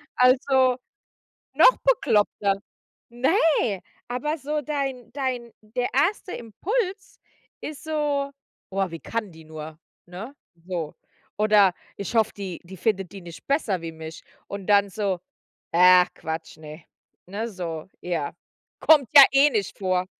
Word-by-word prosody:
Also, 255 0 +4 0.8
noch - - +7
bekloppter. 210 - +2 0.5
Ne, 260 - +2 0.3
aber 255 +6 -2
so 300 +2 -2
dein 270 -5 -4
dein 255 -4 -3
der 245 +4 -2
1. 360 +7 +1
Impuls 380 - -3 0.4
ist 305 +1 -7
so: 295 -3 -1 0.4
„Boah, 195 -2 -1
wie 165 - -7
kann 225 -4 -4
die 160 0 -14
nur?“, 155 0 -9 0.3
ne? 200 +10 -8 0.3
So. 170 -5 -4 0.4
Oder 205 -4 +5 0.2
ich 200 +3 -5
hoffe, 220 -1 +3
die 190 -4 -6
die 190 +2 -11
findet 195 -3 -1
die 195 - -9
nicht 170 -1 -12
besser 220 - 0
wie 165 -1 -5
mich. 160 0 -9 0.3
Und 200 -2 -6
dann 200 -1 +4
so: 195 -3 -2 0.5
„Ach 180 +1 +7
Quatsch, 160 0 -6
ne“, 155 +1 -11 0.4
ne, 210 +5 -4
so, 170 -4 -6
ja. 170 -5 -2 0.5
Kommt 295 -6 +5
ja 280 -2 +12
eh 275 +2 +6
nicht 210 -7 -2
vor. 185 -1 0
210 Hz, 135 wpm, -24 LUFS, 180-275 Hz, 0.8 s, ja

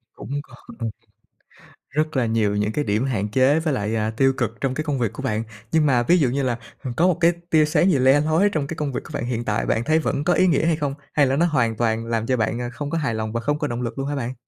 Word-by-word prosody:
Cũng 145 +2 -5
còn 225 - -8 1.0
rất 155 +1 -1
là 125 - +2
nhiều 110 -2 +1
những 105 +1 0
cái 145 - -1
điểm 110 +4 0
hạn 105 -6 -1
chế 135 +6 +3
với 160 -3 -1
lại, 105 -1 -1
à, 110 0 0
tiêu 135 0 +4
cực 115 -4 -3
trong 135 -2 0
cái 155 - -2
công 145 -4 -2
việc 115 -2 -1
của 135 - -7
bạn. 110 -3 -1 0.3
Nhưng 160 -2 +3
mà 125 -4 +3
ví 175 +8 +4
dụ 135 -7 +2
như 135 +2 -1
là 120 -2 0 0.3
h - - -5
có 175 +3 +4
một 180 - +2
cái 170 +1 +5 0.2
tia 155 -2 +4
sáng 175 +5 +3
gì 140 - +2
le 135 +3 +5
lói 160 +7 +3
trong 150 -6 -2
cái 160 - -5
công 145 -3 -2
việc - - -2
của - - -12
bạn - - -2
hiện 120 -1 -2
tại, 105 +2 0
bạn 115 - 0
thấy 155 +3 +2
vẫn 140 -2 -1
có 175 - +2
ý 185 +3 +3
nghĩa 160 -1 +2
hay 165 -2 +3
không? 145 -3 -2 0.2
Hay 145 -2 +4
là 135 - +1
nó 170 +4 +3
hoàn 125 -9 +1
toàn 115 0 0
làm 115 -1 -1
cho 130 0 +1
bạn, 115 +2 -1
à, 120 - -3
không 145 +2 -5
có 165 - -1
hài 140 -7 -1
lòng 110 0 -3
và 115 - -1
không 145 +4 -1
có 150 - -1
động 120 -1 -4
lực 120 +2 -4
luôn 135 - -2
hả 145 - -2
bạn? 125 -1 -3
135 Hz, 305 wpm, -22 LUFS, 115-150 Hz, 1.0 s, cái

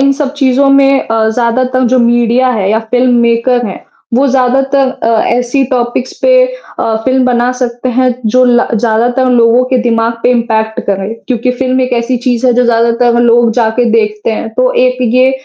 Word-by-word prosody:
इन 275 0 +3
सब 275 -1 -3
चीज़ों 275 0 +1
में 275 0 +3
अ, 225 -1 0
ज़्यादातर 250 +3 -1
जो 255 - +3
मीडिया 240 +1 +1
है 200 -5 -1
या 220 - +1
फ़िल्म 250 0 +2
मेकर 235 +1 +1
है, 190 - -8 0.3
वो 270 +3 +2
ज़्यादातर 270 +1 +1
अ, - - 0 0.2
ऐसी 245 +3 0
टॉपिक्स 245 0 -2
पे - - +3 0.4
अ, 220 - -1
फ़िल्म 260 0 +1
बना 245 0 +1
सकते 245 0 -3
हैं 255 -1 +2
जो 255 +4 +2
ला 245 0 +2
ज़्यादातर 235 +3 0
लोगों 240 0 +3
के 260 - +2
दिमाग़ 230 -1 0
पे - - +2
इम्पैक्ट 220 -2 -1
करे, 195 +1 -2
क्योंकि 250 0 -1
फ़िल्म 260 0 0
एक 255 0 -2
ऐसी 240 +2 -2
चीज़ 245 0 0
है 250 - +3
जो 250 +1 +2
ज़्यादातर 235 +1 +1
लोग 240 0 +3
जाके 230 +1 0
देखते 215 -1 -1
हैं। 225 0 -4
तो 255 +1 +1
एक 255 0 -2 0.2
ये 255 +1 +3
245 Hz, 185 wpm, -10 LUFS, 230-255 Hz, 0.4 s, इन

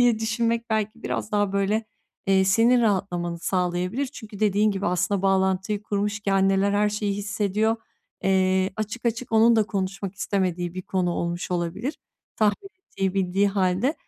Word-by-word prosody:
diye 240 -3 +4
düşünmek 230 +1 -1
belki 220 +1 -1
biraz 215 - -3
daha 205 -2 +1
böyle, 200 +3 +1 0.4
eee, 190 -1 +4
senin 230 +6 +4
rahatlamanı 180 -5 0
sağlayabilir 180 +8 -1
çünkü 220 -6 -10
dediğin 210 0 +3
gibi 195 0 -2
aslında 180 +2 0
bağlantıyı 190 +1 +1
kurmuş 210 0 -2
ki 200 -1 -1
anneler 195 +1 +3
her 210 +1 +3
şeyi 210 -1 -1
hissediyor. 210 +2 0 0.5
Eee, 190 0 +2
açık 215 +3 -4
açık 230 +1 -2
onun 225 +1 +5
da 220 - +5
konuşmak 195 -1 -3
istemediği 180 -3 -1
bir 185 - -5
konu 180 -1 -1
olmuş 170 +1 -3
olabilir 180 - -2 0.4
tahmin 215 - +1
ettiği, 195 - -3
bildiği 195 +1 +2
hâlde. 195 - +1
200 Hz, 155 wpm, -24 LUFS, 190-215 Hz, 0.5 s, onun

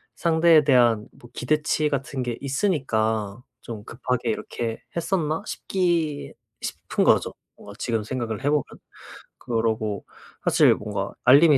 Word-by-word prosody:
상대에 165 -2 +5
대한 120 -6 +4
뭐 120 - -16
기대치 150 +3 +1
같은 135 -1 -2
게 120 -2 -3
있으니까 115 - 0 0.2
좀 110 -3 -7
급하게 125 -1 -2
이렇게 115 +1 -3
했었나 170 -1 0
싶기 170 -6 -1 0.3
싶은 - - -2
거죠. - - +3 0.2
뭔가 100 - -11
지금 115 -3 -1
생각을 115 0 -4
해보면. 145 +1 +3 0.8
그러고 110 -3 -1 0.4
사실 - - +5
뭔가 - - -4
알림이 145 +3 +7
130 Hz, 270 characters per minute, -24 LUFS, 115-155 Hz, 0.8 s, 알림이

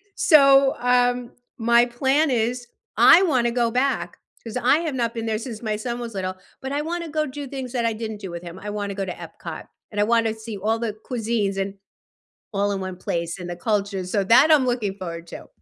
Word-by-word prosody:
So, 275 -3 +6
um, 245 0 +2 0.3
my 235 +1 +4
plan 265 +5 +1
is 240 +1 -1 0.3
I 375 - +8
wanna 255 -8 +2
go 235 -1 +1
back, 265 +3 -1 0.2
'cause 230 +1 -5
I 255 +5 +3
have 320 -5 -3
not 235 -2 -1
been 230 -1 -4
there 220 -1 0
since 230 -2 -7
my 215 -1 -1
son 235 +3 -4
was 235 -1 -6
little, 185 -1 -3 0.3
but 265 +1 -5
I 285 - 0
wanna 335 +1 -4
go 305 0 0
do 285 0 -7
things 260 -2 -6
that 240 -2 0
I 230 - +1
didn't 220 -1 -5
do 195 - -6
with 170 0 -7
him. 175 +1 -9
I 205 +1 -6
wanna 205 -1 -3
go 195 -1 -2
to 185 - -4
Epcot, 165 -1 -9 0.2
and 205 - -4
I 205 - +5
want 230 +1 +2
to 220 - -1
see 220 -1 -7
all 220 +3 0
the 225 -2 -2
cuisines 220 -3 -2
in 195 0 -3 0.8
all 200 0 0
in 195 - -3
one 185 -1 -5
place 170 0 -3
and 175 0 -6
the 175 - -5
culture, 200 0 -1
so, 200 +3 0
that 250 +10 +6
I'm 295 -4 +5
looking 230 -6 -1
forward 170 -3 -7
to. - - -10
230 Hz, 225 wpm, -23 LUFS, 200-250 Hz, 0.8 s, I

